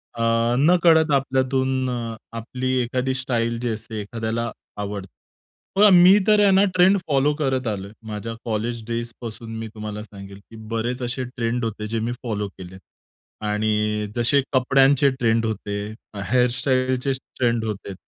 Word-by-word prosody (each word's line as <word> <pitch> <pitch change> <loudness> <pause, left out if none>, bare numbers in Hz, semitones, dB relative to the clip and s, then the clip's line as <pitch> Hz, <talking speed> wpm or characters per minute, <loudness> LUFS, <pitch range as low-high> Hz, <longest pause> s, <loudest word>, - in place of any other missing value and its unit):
अ, 115 +1 +1
नकळत 160 0 +5
आपल्यातून 130 -1 +1
अ, 115 -2 -3 0.2
आपली 130 +3 -3
एखादी 125 +2 -1
स्टाईल 115 -2 -1
जी 120 0 -2
असते 110 0 -5
एखाद्याला 115 +2 -3 0.3
आवडते. 100 -2 -5 0.6
पण 205 0 +7
मी 180 +3 +8
तर 210 -1 +5
आहे 200 -1 +5
ना 190 +1 +5
ट्रेंड 185 +2 +5
फॉलो 145 0 +2
करत 130 -3 0
आलोय. 100 -2 -4 0.2
माझ्या 110 +1 -5
कॉलेज 115 +1 -2
डेजपासून 115 -1 -6
मी 115 - -5
तुम्हाला 105 -1 -6
सांगेल, 100 -2 -11
की - - -11 0.2
बरेच 120 +3 -2
असे 125 +2 -2
ट्रेंड 120 -1 -2
होते 105 -1 -4
जे 115 +1 -2
मी 115 +2 -2
फॉलो 105 -4 -2
केलेत 95 0 -10 0.7
आणि 105 0 0
जसे 125 +4 +3
कपड्यांचे 135 +2 +4
ट्रेंड 115 -1 +2
होते, 105 -2 -3 0.4
अ, 100 - -7
हेअरस्टाईलचे 130 +1 +1
स 130 - -6 0.2
ट्रेंड 120 -2 +1
होते, 100 -2 -5
120 Hz, 150 wpm, -23 LUFS, 110-130 Hz, 0.7 s, मी